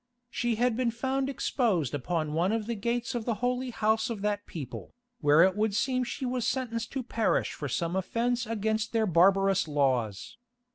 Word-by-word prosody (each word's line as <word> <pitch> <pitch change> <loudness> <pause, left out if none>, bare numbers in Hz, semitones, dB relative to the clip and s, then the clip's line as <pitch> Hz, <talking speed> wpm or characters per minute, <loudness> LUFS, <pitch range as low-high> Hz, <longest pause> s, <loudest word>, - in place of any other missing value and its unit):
She 240 -2 0
had 240 +1 +1
been 250 0 +1
found 265 +4 -1
exposed 225 - 0
upon 155 +2 -2
one 175 +5 +1
of 225 -1 -1
the 235 - -2
gates 235 +3 -2
of 235 -3 -3
the 235 - 0
holy 250 +2 -1
house 220 0 +1
of 215 -4 -5
that 205 -1 -1
people, 140 -6 -8 0.2
where 150 +3 +5
it 185 0 +3
would 210 -1 0
seem 255 +1 +1
she 260 +2 -4
was 250 -1 -1
sentenced 230 -3 -2
to 265 -2 -2
perish 225 -2 0
for 145 - -5
some 170 +7 -1
offence 235 +5 -1
against 220 0 -1
their 225 -1 +2
barbarous 195 +1 +4
laws. 130 - 0
220 Hz, 185 wpm, -29 LUFS, 180-240 Hz, 0.2 s, where